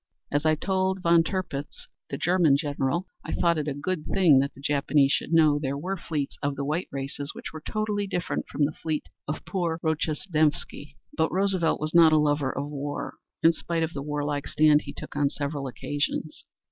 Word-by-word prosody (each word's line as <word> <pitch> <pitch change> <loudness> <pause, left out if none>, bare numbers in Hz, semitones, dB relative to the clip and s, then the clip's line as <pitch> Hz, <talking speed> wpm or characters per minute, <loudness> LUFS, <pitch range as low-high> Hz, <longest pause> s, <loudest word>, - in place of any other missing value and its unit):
As 145 +2 +1
I 155 - +4
told 190 +2 0
Von 170 0 +6
Tirpitz 165 -6 -4 0.2
(the 140 - -3
German 175 -5 +4
admiral), 145 +4 -1 0.2
I - - -5
thought 170 -2 +2
it 150 - -3
a 145 - -2
good 155 +3 -2
thing 170 -8 +5
that 140 +1 0
the - - -14
Japanese 140 0 +2
should - - 0
know 155 -3 +5
there 140 -1 -2
were 185 +7 -3
fleets 155 -5 -4
of 145 0 -1
the 140 - -3
white 155 +6 -1
races 140 +1 -5
which - - -7
were 155 - -7
totally 210 +1 -2
different 180 -2 -2
from 145 - +1
the 145 - -1
fleet 155 -1 -3 0.2
of 150 - -4
poor 170 -4 -1
Rojestvensky." 155 -2 -1 0.2
But 160 0 +1
Roosevelt 190 -3 +1
was 155 +1 -3
not 165 -2 +7
a - - +6
lover 145 -2 +2
of 140 +2 -4
war 145 0 -4 0.3
in 165 +1 +7
spite 165 0 -2
of 160 +1 -2
the 140 - -4
warlike 145 0 -2
stand 150 -1 +4
he - - -6
took - - -9
on 145 -1 +2
several 140 -1 -3
occasions. 145 +4 -3
155 Hz, 195 wpm, -26 LUFS, 145-170 Hz, 0.3 s, not